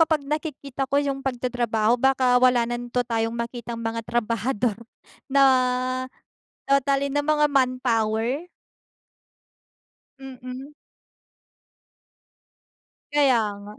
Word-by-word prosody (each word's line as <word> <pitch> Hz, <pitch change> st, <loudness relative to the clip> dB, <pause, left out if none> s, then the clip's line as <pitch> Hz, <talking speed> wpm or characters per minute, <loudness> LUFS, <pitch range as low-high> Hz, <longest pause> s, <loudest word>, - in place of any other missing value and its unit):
kapag 315 Hz, -3 st, +2 dB
nakikita 280 Hz, -3 st, -4 dB
ko 280 Hz, -, 0 dB
yung 280 Hz, -1 st, 0 dB
pagtatrabaho 240 Hz, -3 st, 0 dB
baka 255 Hz, -1 st, +3 dB
wala 250 Hz, -2 st, +4 dB
nanto 240 Hz, +1 st, -2 dB
tayong 230 Hz, -1 st, -1 dB
makitang 235 Hz, -1 st, -5 dB
mga 225 Hz, 0 st, -2 dB
trabahador 230 Hz, 0 st, -1 dB, 0.5 s
na 275 Hz, 0 st, +4 dB, 1.2 s
totally 275 Hz, 0 st, +2 dB
na 290 Hz, +1 st, -1 dB
mga 300 Hz, 0 st, +3 dB
manpower? 255 Hz, +1 st, 0 dB, 1.7 s
Mm. 260 Hz, +1 st, -9 dB, 2.4 s
Kaya 275 Hz, -5 st, +4 dB, 0.2 s
nga. 210 Hz, +1 st, -11 dB
255 Hz, 85 wpm, -24 LUFS, 235-275 Hz, 2.4 s, wala